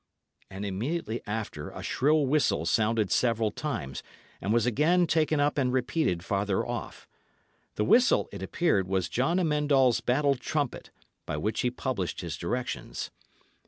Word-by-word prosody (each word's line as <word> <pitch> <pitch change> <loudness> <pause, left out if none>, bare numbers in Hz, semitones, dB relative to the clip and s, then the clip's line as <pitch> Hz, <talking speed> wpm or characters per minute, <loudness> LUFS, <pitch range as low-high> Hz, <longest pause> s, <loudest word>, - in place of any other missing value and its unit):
And 100 +1 -6
immediately 115 - -3
after 105 -8 -4
a - - -8
shrill 150 +2 +2
whistle 135 - +1
sounded 110 +3 +1
several 115 -3 +2
times, 70 - -4 0.4
and 100 - -1
was 115 0 +3
again 155 +9 +3
taken 155 -2 +1
up 145 0 +2
and 130 -2 +1
repeated 125 - 0
farther 100 -1 0
off. - - -6 0.7
The 105 - 0
whistle, 245 - +4
it 100 - -8
appeared, 100 - +1
was 95 -2 0
John 135 - +1
Amend 150 -4 +1
All's 130 -4 +4
battle 140 +3 +2
trumpet, 140 +1 -3 0.4
by - - -2
which 105 +8 -1
he 125 - +1
published 125 -7 -3
his 85 -3 -4
directions. 120 +10 -4
120 Hz, 150 wpm, -28 LUFS, 100-150 Hz, 0.7 s, whistle